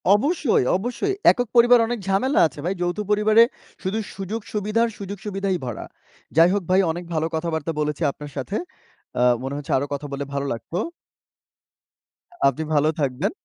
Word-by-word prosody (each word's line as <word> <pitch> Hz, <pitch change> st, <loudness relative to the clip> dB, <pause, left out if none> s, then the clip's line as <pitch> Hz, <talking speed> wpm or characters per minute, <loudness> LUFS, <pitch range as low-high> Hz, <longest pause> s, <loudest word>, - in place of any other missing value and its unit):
অবশ্যই, 280 Hz, -, +2 dB
অবশ্যই। 250 Hz, -, -2 dB, 0.2 s
একক-পরিবার 240 Hz, 0 st, +4 dB
অনেক 240 Hz, -2 st, -2 dB
ঝামেলা 205 Hz, +9 st, +2 dB
আছে 150 Hz, -, -13 dB
ভাই। 185 Hz, -, 0 dB
যৌথ 175 Hz, +2 st, -1 dB
পরিবারে 215 Hz, +2 st, +6 dB, 0.4 s
শুধু 200 Hz, +4 st, -1 dB, 0.2 s
সুযোগ-সুবিধার, 210 Hz, +3 st, -1 dB
সুযোগ-সুবিধাই 195 Hz, -1 st, -3 dB
ভরা। 120 Hz, -, -5 dB, 0.5 s
যাই 165 Hz, +2 st, +7 dB
হোক 200 Hz, -3 st, 0 dB
ভাই 190 Hz, +1 st, +5 dB
অনেক 175 Hz, +2 st, -5 dB
ভালো 160 Hz, 0 st, 0 dB
কথাবার্তা 160 Hz, -1 st, -2 dB
বলেছি 150 Hz, +2 st, -2 dB
আপনার 145 Hz, 0 st, -10 dB
সাথে। 195 Hz, +11 st, -3 dB, 0.6 s
আ -, -, +5 dB, 0.2 s
মনে 135 Hz, +1 st, -3 dB
হচ্ছে 145 Hz, -, -6 dB
আরও 140 Hz, +2 st, -1 dB
কথা 145 Hz, +1 st, -4 dB
বললে 140 Hz, +1 st, -3 dB
ভালো 140 Hz, 0 st, -1 dB
লাগতো। 165 Hz, +9 st, -5 dB, 1.7 s
আপনি 140 Hz, +4 st, 0 dB
ভালো 150 Hz, +1 st, +3 dB
থাকবেন। 135 Hz, +6 st, 0 dB
190 Hz, 145 wpm, -23 LUFS, 150-215 Hz, 1.7 s, যাই